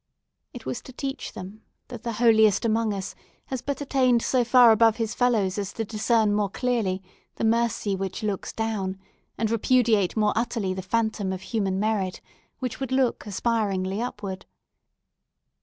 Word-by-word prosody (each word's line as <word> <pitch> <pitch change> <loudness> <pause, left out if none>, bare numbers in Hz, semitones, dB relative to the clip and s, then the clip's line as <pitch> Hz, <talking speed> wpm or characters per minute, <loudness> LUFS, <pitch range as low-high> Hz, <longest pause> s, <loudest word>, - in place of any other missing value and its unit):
It 240 -3 -10
was 245 - -3
to - - -12
teach 270 +2 -5
them, 195 +4 -9 0.3
that 245 -4 -8
the 235 - -3
holiest 220 -2 +4
amongst 220 -1 +1
us 190 - -6 0.3
has 260 -2 -4
but 280 +1 -3
attained 255 -4 +2
so 255 -2 +2
far 240 0 +7
above 225 0 +5
his 225 -1 -2
fellows 215 -6 +1
as 200 -1 -3
to 225 - -3
discern 215 0 +2
more 205 -1 +1
clearly 215 -5 -1 0.3
the - - -4
Mercy 225 -3 +1
which 190 +2 -4
looks 205 -3 -2
down, 205 -4 -2 0.4
and 220 0 0
repudiate 225 -4 +2
more 210 -1 +3
utterly 225 -4 -1
the 190 - -4
phantom 220 0 -1
of 190 -1 -4
human 195 -3 -1
merit, 205 -3 -1 0.4
which 255 -3 -4
would 265 -1 -4
look 260 -4 +1
aspiringly 200 -2 -1
upward. 200 -6 -5
220 Hz, 160 wpm, -25 LUFS, 200-235 Hz, 0.4 s, far